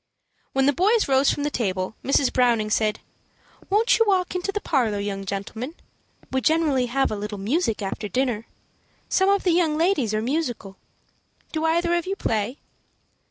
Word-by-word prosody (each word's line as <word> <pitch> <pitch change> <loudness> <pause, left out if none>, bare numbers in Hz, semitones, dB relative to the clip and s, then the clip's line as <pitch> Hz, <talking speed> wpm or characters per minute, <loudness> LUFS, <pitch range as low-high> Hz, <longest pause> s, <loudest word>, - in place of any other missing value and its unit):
When 270 0 +2
the 285 - +4
boys 420 - +2
rose 270 0 +4
from 290 - -1
the 295 - -1
table, 190 -6 -2
Mrs. 275 0 +2
Browning 235 -4 +2
said, 215 -1 +1 0.7
"Won't 430 +5 +3
you 455 - +5
walk 370 -3 +1
into 365 +2 -2
the 415 - -2
parlor, 240 - 0
young 200 -1 -4
gentlemen? 220 - -5 0.6
We 265 0 0
generally 305 -6 +2
have 270 +3 0
a - - -1
little 210 0 -5
music 225 - -1
after 205 +2 -4
dinner. 235 0 -1 0.6
Some 380 0 +3
of 400 0 +2
the 360 - +3
young 330 -3 +2
ladies 310 - +1
are 215 - 0
musical. 245 -8 -3 0.7
Do 315 0 -1
either 340 +2 +2
of 345 0 0
you 390 - -1
play?" 225 - -2
265 Hz, 170 wpm, -24 LUFS, 215-340 Hz, 0.7 s, you